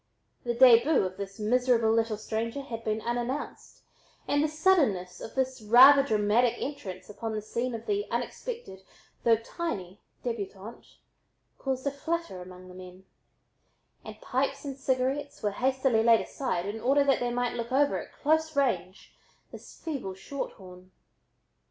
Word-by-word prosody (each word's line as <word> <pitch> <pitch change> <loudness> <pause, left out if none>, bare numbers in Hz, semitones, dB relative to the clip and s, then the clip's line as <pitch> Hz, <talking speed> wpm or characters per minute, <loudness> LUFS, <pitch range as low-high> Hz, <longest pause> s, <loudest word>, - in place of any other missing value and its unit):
The 240 -1 -2
"déboo" 250 +1 +6
of 185 0 -5
this 195 0 -7
miserable 235 0 +2
little 225 -1 +1
stranger 230 +5 -3
had 230 -4 -7
been 215 0 -1
unannounced 240 +5 -4 0.4
and 290 +1 +2
the - - +2
suddenness 285 - +1
of - - -8
this 260 -2 -1
rather 255 +6 +8
dramatic 220 -1 +2
entrance 190 -10 -6
upon 220 +2 -5
the 215 - -3
scene 235 +3 -3
of 225 - -8
the 410 0 -1
unexpected, 465 - -5 0.4
though 230 -1 +5
tiny 215 - -5 0.2
débutante, 215 -2 -6 0.6
caused 265 -1 -2
quite 280 - -1
a - - -17
flutter 335 - -3
among 180 0 -11
the 180 - -12
men, 185 +1 -12 1.0
and - - -10
pipes 275 +2 -2
and 275 -1 -4
cigarettes 270 +2 -2
were 205 - +1
hastily 260 +1 +1
laid 230 -1 +5
aside 190 -10 -3
in 210 +2 -5
order 280 +3 +3
that 275 -2 +2
they 245 - -1
might 245 0 -1
look 235 0 -4
over 280 +2 +2
at - - -10
close 315 +1 0
range 190 -10 -1 0.4
this - - -12
"feeble 270 - -4
short 275 +9 -6
horn." 185 -1 -14
235 Hz, 155 wpm, -28 LUFS, 210-275 Hz, 1.0 s, rather